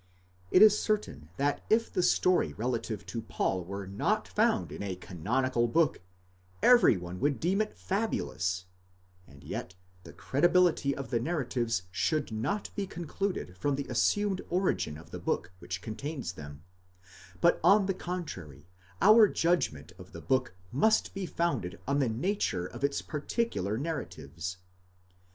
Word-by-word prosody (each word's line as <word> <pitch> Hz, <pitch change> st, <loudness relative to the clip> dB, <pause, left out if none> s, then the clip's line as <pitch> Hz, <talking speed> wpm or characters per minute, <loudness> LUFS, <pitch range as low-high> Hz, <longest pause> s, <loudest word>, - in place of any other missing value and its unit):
It 185 Hz, -, +7 dB
is 210 Hz, -1 st, +7 dB
certain 80 Hz, -, -2 dB
that 145 Hz, +1 st, 0 dB
if 230 Hz, +1 st, +2 dB
the -, -, +2 dB
story 180 Hz, 0 st, +3 dB
relative 115 Hz, -2 st, -3 dB
to 115 Hz, -, -4 dB
Paul 95 Hz, -4 st, -1 dB
were 100 Hz, +2 st, -6 dB
not 205 Hz, -, -1 dB
found 225 Hz, +1 st, +1 dB
in -, -, -7 dB
a 100 Hz, -2 st, -3 dB
canonical 120 Hz, +8 st, 0 dB
book, 160 Hz, -, +2 dB, 0.6 s
every 240 Hz, -, +7 dB
one 90 Hz, +1 st, -7 dB
would 145 Hz, -1 st, +1 dB
deem 190 Hz, +5 st, +1 dB
it 215 Hz, -, -4 dB
fabulous, 90 Hz, -, -2 dB, 0.6 s
and 70 Hz, -1 st, -16 dB
yet 90 Hz, -, -6 dB, 0.3 s
the 85 Hz, -, -11 dB
credibility 170 Hz, -1 st, +2 dB
of 135 Hz, -1 st, -7 dB
the 120 Hz, -, +2 dB
narratives 120 Hz, -, -1 dB
should 140 Hz, -, 0 dB
not 130 Hz, -, -2 dB
be 200 Hz, -2 st, -2 dB
concluded 175 Hz, -, -4 dB
from 140 Hz, +9 st, 0 dB
the 140 Hz, 0 st, -3 dB
assumed 195 Hz, -, +1 dB
origin 180 Hz, -, 0 dB
of 80 Hz, -, -14 dB
the -, -, -6 dB
book -, -, -2 dB
which 90 Hz, +2 st, -6 dB
contains 130 Hz, -, -5 dB
them, 75 Hz, -2 st, -10 dB, 0.8 s
but 170 Hz, -, +4 dB
on 200 Hz, 0 st, +6 dB
the 195 Hz, -, 0 dB
contrary, 95 Hz, -, -6 dB, 0.4 s
our 215 Hz, +1 st, +8 dB
judgment 165 Hz, -, 0 dB
of -, -, -13 dB
the -, -, -8 dB
book 130 Hz, -7 st, 0 dB, 0.2 s
must 220 Hz, -, +2 dB
be 195 Hz, -2 st, -4 dB
founded 165 Hz, -, -2 dB
on 140 Hz, +1 st, +2 dB
the 130 Hz, -4 st, +2 dB
nature 115 Hz, -, -1 dB
of 110 Hz, -, -8 dB
its 140 Hz, 0 st, 0 dB
particular 150 Hz, -, -2 dB
narratives. 90 Hz, -, -5 dB
135 Hz, 150 wpm, -30 LUFS, -, 0.8 s, our